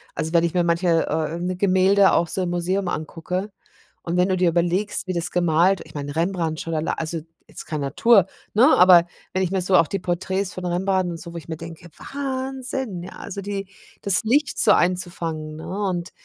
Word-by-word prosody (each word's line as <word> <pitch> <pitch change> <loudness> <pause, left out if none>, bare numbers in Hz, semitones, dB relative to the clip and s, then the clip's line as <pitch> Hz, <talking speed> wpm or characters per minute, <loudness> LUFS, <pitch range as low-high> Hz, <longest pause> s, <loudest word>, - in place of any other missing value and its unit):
also 160 +2 -3
wenn 170 -1 +4
ich 170 +1 -1
mir 175 - +3
manche, 170 -1 +2
äh, 165 +4 -2
Gemälde 190 +1 +4
auch 170 - +2
so 190 - -2
im 180 - -1
Museum 180 +2 -1
angucke 180 +4 -4 0.5
und 170 +1 -3
wenn 180 +2 +3
du 185 - +2
dir 180 -1 +3
überlegst, 175 +5 0
wie 185 - -3
das 170 0 -2
gemalt, 175 +2 +2
ich - - -16
meine, 145 0 -5
Rembrandt, 165 -2 -1
schon 165 - -4
allei 155 0 -1
also 165 +1 -3 0.3
jetzt - - -9
kein 155 -2 -3
Natur, 195 +9 +4 0.3
ne? 235 +5 +6
Aber 180 -1 +8 0.3
wenn 190 - +1
ich 180 - -2
mir 190 -1 0
so 185 +1 +2
auch 165 -3 +5
die 195 - -3
Porträts 185 +2 -2
von 185 - -6
Rembrandt 185 +1 0
und 165 - -7
so, 170 -2 -9
wo - - -6
ich 160 - -9
mir 160 -1 -5
denke. 165 +1 -10 0.2
Wahnsinn, 265 -7 -4
ja, 185 - -9
also 200 - -6
die 195 -1 -5 0.3
das 200 +2 +2
Licht 275 +6 +1
so - - +5
einzufangen, 170 -4 -1
ne? 160 - -8 0.2
Und 175 -1 -3
180 Hz, 205 wpm, -22 LUFS, 165-190 Hz, 0.5 s, Aber